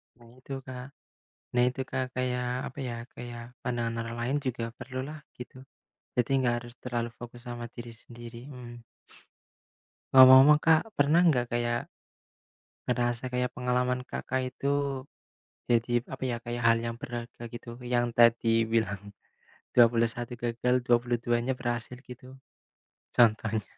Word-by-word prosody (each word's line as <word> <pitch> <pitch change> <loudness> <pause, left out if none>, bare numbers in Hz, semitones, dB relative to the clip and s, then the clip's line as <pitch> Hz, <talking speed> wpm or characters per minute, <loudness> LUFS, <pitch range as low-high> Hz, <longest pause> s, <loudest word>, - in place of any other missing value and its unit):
Nah 120 -1 -18
itu 135 - -8
Kak. 125 -1 -7 0.7
Nah 120 - +4
itu 125 +1 -5
Kak 130 - 0
kayak 125 -1 -1 0.2
apa 135 - -16
ya, 120 - -4 0.2
kayak 120 -1 -7 0.2
pandangan 120 -2 -2
orang 115 0 -5
lain 125 +4 0
juga 120 -2 -2
perlulah 130 +4 -6 0.2
gitu. 125 +1 -9 0.6
Jadi 125 0 +1
nggak 120 -2 +2
harus 120 0 -12
terlalu 120 -2 -2
fokus 120 0 -10
sama 120 -1 -5
diri 120 -1 -8
sendiri. 120 +1 -11
Mhm. 120 -2 -10 1.3
Ngomong-ngomong 130 +3 +9
Kak, 160 -1 +5
pernah 145 +4 +4 0.2
gak 120 -1 -1
kayak 120 0 -1 0.9
ngerasa 120 0 0
kayak 125 0 0
pengalaman 125 0 0
Kakak 130 0 -3
itu 140 - -3 1.0
jadi 120 0 +2
apa 135 - -8
ya, 120 - -1
kayak 120 0 -4
hal 115 0 +5
yang 115 0 -4
berharga 120 -1 -7
gitu 120 0 -8
yang 120 0 +2
tadi 115 -1 +5
bilang, 110 -3 0 0.8
21 115 0 +3
gagal, 120 +1 +1
22 120 0 +2
nya 130 - 0
berhasil 120 0 -3
gitu 125 +1 -11 0.9
contohnya? 110 -2 +3
120 Hz, 135 wpm, -29 LUFS, 120-125 Hz, 1.3 s, Ngomong-ngomong